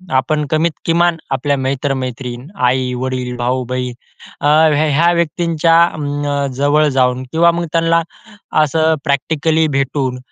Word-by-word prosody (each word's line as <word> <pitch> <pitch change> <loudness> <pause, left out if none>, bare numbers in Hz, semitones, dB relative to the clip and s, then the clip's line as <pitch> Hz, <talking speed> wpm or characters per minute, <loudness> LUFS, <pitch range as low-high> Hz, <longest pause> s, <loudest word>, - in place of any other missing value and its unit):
आपण 150 +4 +1
कमीत 160 +2 +2
किमान 170 +1 +2 0.2
आपल्या 140 +2 0
मित्र-मैत्रीण, 130 -1 -3 0.2
आई-वडील, 125 0 -1
भाऊ-बहीण 125 0 -2 0.5
अ, 145 - +1 0.3
ह्या 155 +2 +2
ह्या 170 +3 +4
व्यक्तींच्या 170 0 +2
अं, 145 -1 -2
जवळ 145 +2 +2
जाऊन 125 0 +2
किंवा 170 +1 +4
मग 170 0 -3
त्यांना 165 0 +2 0.6
असं 160 +2 +1
प्रॅक्टिकली 160 +3 +1
भेटून 135 -2 -1
145 Hz, 115 wpm, -16 LUFS, 130-160 Hz, 0.6 s, ह्या